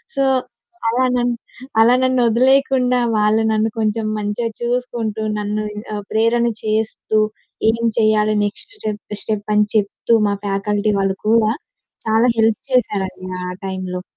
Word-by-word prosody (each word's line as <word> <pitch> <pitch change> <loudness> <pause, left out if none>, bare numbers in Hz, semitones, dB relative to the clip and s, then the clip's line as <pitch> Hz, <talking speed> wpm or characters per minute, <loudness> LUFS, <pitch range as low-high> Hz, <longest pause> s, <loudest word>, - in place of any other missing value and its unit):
So, 275 - +2 0.7
అలా 250 +3 +1
నన్ను, 240 0 +1 0.5
అలా 235 +2 +6
నన్ను 255 -1 +2
ఒదిలేయకుండా 255 +1 +3 0.2
వాళ్ళు 210 +1 +3
నన్ను 215 +1 +1
కొంచెం 215 0 0
మంచిగా 210 +3 -2
చూసుకుంటూ 235 -3 -2 0.2
నన్ను 210 +1 -2 0.3
ఆ - - -2
ప్రేరణ 230 +2 +2 0.2
చేస్తూ 215 0 0 0.5
ఏం 230 +1 -4 0.2
చేయాలి 215 -1 +3
నెక్స్ట్ 210 - -6
స్టెప్ 210 - -5
స్టెప్ 215 -1 -3
అని 210 0 +4
చెప్తూ, 210 +2 +1 0.2
మా - - +1
ఫ్యాకల్టీ 205 +1 0
వాళ్ళు 195 0 0
కూడా 220 -1 +4 0.6
చాలా 225 +3 +4
హెల్ప్ 220 -1 +2
చేసారండి 190 -7 0 0.2
ఆ - - -3
టైంలో. 185 -1 -4
220 Hz, 130 wpm, -19 LUFS, 210-235 Hz, 0.7 s, అలా